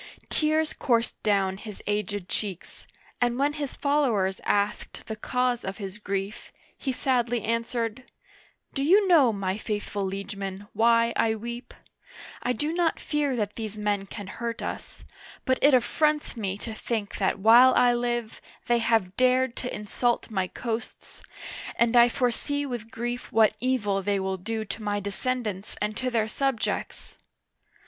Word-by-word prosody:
Tears 310 Hz, 0 st, +1 dB
coursed 235 Hz, -3 st, 0 dB
down 195 Hz, -2 st, +1 dB
his 210 Hz, -1 st, -9 dB
aged 205 Hz, -2 st, -2 dB
cheeks, 195 Hz, -5 st, -5 dB, 0.3 s
and 240 Hz, 0 st, +2 dB
when 285 Hz, +2 st, +2 dB
his 290 Hz, -3 st, -4 dB
followers 240 Hz, -10 st, +1 dB
asked 205 Hz, 0 st, -1 dB
the 220 Hz, -, -5 dB
cause 250 Hz, +2 st, 0 dB
of 190 Hz, +1 st, -4 dB
his 195 Hz, 0 st, -6 dB
grief, 200 Hz, +1 st, -4 dB, 0.2 s
he 270 Hz, -, -3 dB
sadly 245 Hz, -3 st, 0 dB
answered: 230 Hz, +1 st, -2 dB, 0.4 s
" -, -, -34 dB
Do 275 Hz, -, -2 dB
you 385 Hz, +8 st, +5 dB
know, 305 Hz, -10 st, +6 dB
my 195 Hz, -1 st, -2 dB
faithful 205 Hz, -2 st, -3 dB
liegemen, 195 Hz, 0 st, -5 dB
why 230 Hz, 0 st, +4 dB
I 220 Hz, -1 st, +2 dB
weep? 235 Hz, +3 st, -7 dB, 0.7 s
I 250 Hz, -, 0 dB
do 295 Hz, +7 st, -1 dB
not 340 Hz, -2 st, +1 dB
fear 295 Hz, -3 st, 0 dB
that 210 Hz, -3 st, -2 dB
these 215 Hz, -2 st, -5 dB
men 205 Hz, -2 st, -1 dB
can 205 Hz, +1 st, -7 dB
hurt 230 Hz, +3 st, -5 dB
us, -, -, -6 dB, 0.4 s
but 260 Hz, 0 st, +2 dB
it 285 Hz, -1 st, +6 dB
affronts 300 Hz, +5 st, +1 dB
me 200 Hz, -4 st, -3 dB
to 225 Hz, +2 st, -6 dB
think 215 Hz, -2 st, -3 dB
that 190 Hz, -, +1 dB
while 235 Hz, +5 st, +7 dB
I 245 Hz, -1 st, +5 dB
live, 240 Hz, -2 st, -2 dB, 0.2 s
they 240 Hz, 0 st, +3 dB
have 220 Hz, -5 st, +1 dB
dared 255 Hz, -1 st, +3 dB
to 250 Hz, -, -4 dB
insult 235 Hz, +3 st, -1 dB
my 190 Hz, -3 st, 0 dB
coasts, 225 Hz, +3 st, -6 dB, 0.5 s
and 235 Hz, +1 st, +2 dB
I 240 Hz, 0 st, +8 dB
foresee 275 Hz, +4 st, 0 dB
with 240 Hz, -4 st, -5 dB
grief 240 Hz, +2 st, -4 dB
what 215 Hz, -1 st, +4 dB
evil 210 Hz, -6 st, +1 dB
they 200 Hz, +1 st, 0 dB
will 190 Hz, 0 st, -2 dB
do 220 Hz, +4 st, -3 dB
to 220 Hz, -, -6 dB
my 205 Hz, -1 st, -1 dB
descendants 205 Hz, 0 st, -3 dB
and 210 Hz, +1 st, -1 dB
to 255 Hz, -, -1 dB
their 225 Hz, -3 st, +1 dB
subjects 270 Hz, 0 st, -2 dB
230 Hz, 155 wpm, -27 LUFS, 205-250 Hz, 0.7 s, I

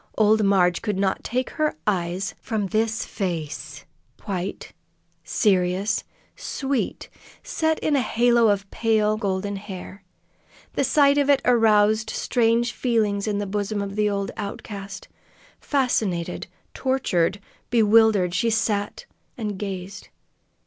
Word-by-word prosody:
Old 215 Hz, 0 st, +4 dB
Marg 185 Hz, -3 st, +3 dB
could 210 Hz, -4 st, -2 dB
not 195 Hz, -1 st, 0 dB
take 255 Hz, +2 st, -2 dB
her 310 Hz, -1 st, 0 dB
eyes 185 Hz, -1 st, -1 dB
from 220 Hz, -4 st, -2 dB
this 220 Hz, +2 st, 0 dB
face 150 Hz, -, -5 dB, 0.4 s
white, 190 Hz, -1 st, -4 dB, 0.5 s
serious, 190 Hz, +1 st, +1 dB, 0.3 s
sweet, 270 Hz, -1 st, -3 dB, 0.4 s
set 320 Hz, 0 st, 0 dB
in 300 Hz, -, +1 dB
a 275 Hz, -, +3 dB
halo 235 Hz, -1 st, +3 dB
of 200 Hz, -1 st, +1 dB
pale 215 Hz, -2 st, +2 dB
golden 200 Hz, -1 st, -2 dB
hair. 195 Hz, 0 st, -9 dB, 0.7 s
The -, -, 0 dB
sight 280 Hz, +1 st, +4 dB
of 285 Hz, 0 st, +1 dB
it 280 Hz, -2 st, +5 dB
aroused 220 Hz, -2 st, +4 dB
strange 235 Hz, -1 st, +1 dB
feelings 215 Hz, -5 st, 0 dB
in 210 Hz, -1 st, 0 dB
the 205 Hz, -, -2 dB
bosom 205 Hz, +1 st, -2 dB
of 200 Hz, 0 st, -4 dB
the 210 Hz, 0 st, +2 dB
old 200 Hz, -1 st, -2 dB
outcast. 200 Hz, 0 st, -7 dB, 0.5 s
Fascinated, 220 Hz, -, -1 dB, 0.3 s
tortured, 205 Hz, -8 st, 0 dB, 0.3 s
bewildered, 220 Hz, -5 st, +4 dB
she 230 Hz, +5 st, +1 dB
sat 220 Hz, -, -1 dB, 0.3 s
and 210 Hz, -5 st, -4 dB
gazed. 195 Hz, 0 st, -6 dB
210 Hz, 120 wpm, -24 LUFS, 195-230 Hz, 0.7 s, it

